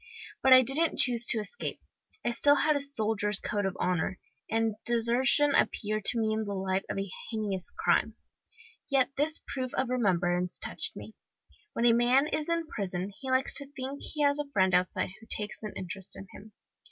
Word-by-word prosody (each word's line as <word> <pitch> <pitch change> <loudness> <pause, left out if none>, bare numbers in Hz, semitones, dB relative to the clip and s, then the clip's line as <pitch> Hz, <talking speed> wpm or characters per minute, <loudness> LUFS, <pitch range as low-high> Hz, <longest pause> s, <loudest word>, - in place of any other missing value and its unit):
But 265 - +3
I 255 0 +9
didn't 285 +7 +2
choose 240 -2 +5
to - - +4
escape. 215 - -5 0.5
I - - +1
still 285 +4 +5
had 305 +1 +2
a - - +1
soldier's 215 -6 -1
code 205 -2 -2
of 190 - -5
honour, 180 +1 -1 0.3
and 225 0 0
desertion 240 +5 +4
appeared 215 -4 0
to 245 - +6
me 220 -1 0
in 220 0 -1
the 200 -1 -5
light 190 0 -1
of - - -3
a 195 0 -3 0.2
heinous 205 -5 -4
crime. - - 0 0.7
Yet 270 -1 +2
this 305 +3 0
proof 255 -2 -4
of 260 -1 -1
remembrance 180 -7 +1
touched - - -2
me. - - -10 0.6
When 235 - -1
a 235 - +6
man 245 +4 +3
is 305 +1 -3
in 335 0 0
prison 195 - -4
he 265 - -6
likes 260 +1 +1
to 280 -1 -2
think 270 +2 -6
he 305 -2 -2
has 285 0 +2
a 295 -1 -4
friend 190 -6 +2
outside 180 0 0
who 225 - -17
takes 210 0 -4
an 215 -2 -6
interest 185 +1 -5
in 195 - -9
him. 215 +1 -14
230 Hz, 190 wpm, -29 LUFS, 200-270 Hz, 0.7 s, I